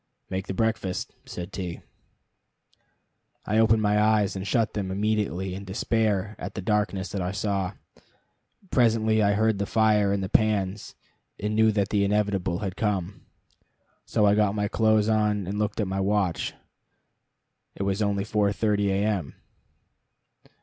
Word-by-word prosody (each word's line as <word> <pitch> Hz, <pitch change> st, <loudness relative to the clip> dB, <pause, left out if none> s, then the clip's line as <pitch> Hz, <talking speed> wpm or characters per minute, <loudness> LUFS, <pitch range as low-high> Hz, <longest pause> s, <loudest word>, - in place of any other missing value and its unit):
"Make 95 Hz, +1 st, -3 dB
the 95 Hz, -, -4 dB
breakfast," 110 Hz, -3 st, -1 dB
said 90 Hz, 0 st, -7 dB
T. 90 Hz, -3 st, -5 dB, 1.6 s
I 105 Hz, +1 st, +1 dB
opened 110 Hz, -1 st, +4 dB
my 105 Hz, 0 st, +3 dB
eyes, 105 Hz, -2 st, +2 dB
and 95 Hz, +1 st, -4 dB
shut 115 Hz, +2 st, +1 dB
them 100 Hz, -3 st, -3 dB
immediately 95 Hz, -2 st, -1 dB
in 95 Hz, +1 st, -6 dB
despair 105 Hz, 0 st, -1 dB
at -, -, -6 dB
the -, -, -3 dB
darkness 100 Hz, -3 st, 0 dB
that 100 Hz, -, -3 dB
I 90 Hz, +1 st, -2 dB
saw. 100 Hz, -2 st, -2 dB, 1.0 s
Presently 110 Hz, -3 st, +3 dB
I 100 Hz, -1 st, +3 dB
heard 110 Hz, -1 st, +1 dB
the 100 Hz, -, -1 dB
fire 105 Hz, -2 st, +3 dB
and 100 Hz, -1 st, 0 dB
the -, -, -2 dB
pans, 105 Hz, -1 st, 0 dB, 0.4 s
and 105 Hz, +1 st, -2 dB
knew 110 Hz, 0 st, +4 dB
that 100 Hz, -2 st, 0 dB
the 100 Hz, -1 st, +2 dB
inevitable 100 Hz, -3 st, 0 dB
had 95 Hz, -1 st, -4 dB
come. 100 Hz, -3 st, -2 dB, 0.8 s
So 105 Hz, -, +1 dB
I 100 Hz, -, +5 dB
got 105 Hz, -1 st, +2 dB
my 105 Hz, -1 st, 0 dB
clothes 110 Hz, -1 st, +2 dB
on, 105 Hz, -2 st, +1 dB
and 95 Hz, -, -4 dB
we 105 Hz, -, -3 dB
looked 105 Hz, 0 st, -1 dB
at 105 Hz, -, 0 dB
my 95 Hz, +1 st, -2 dB
watch. 95 Hz, -3 st, 0 dB, 1.2 s
It -, -, -3 dB
was 100 Hz, +1 st, -1 dB
only 100 Hz, -1 st, 0 dB
4.30 105 Hz, 0 st, +1 dB
A. 100 Hz, +1 st, +1 dB
M. 100 Hz, -9 st, -2 dB
105 Hz, 155 wpm, -26 LUFS, 95-110 Hz, 1.6 s, I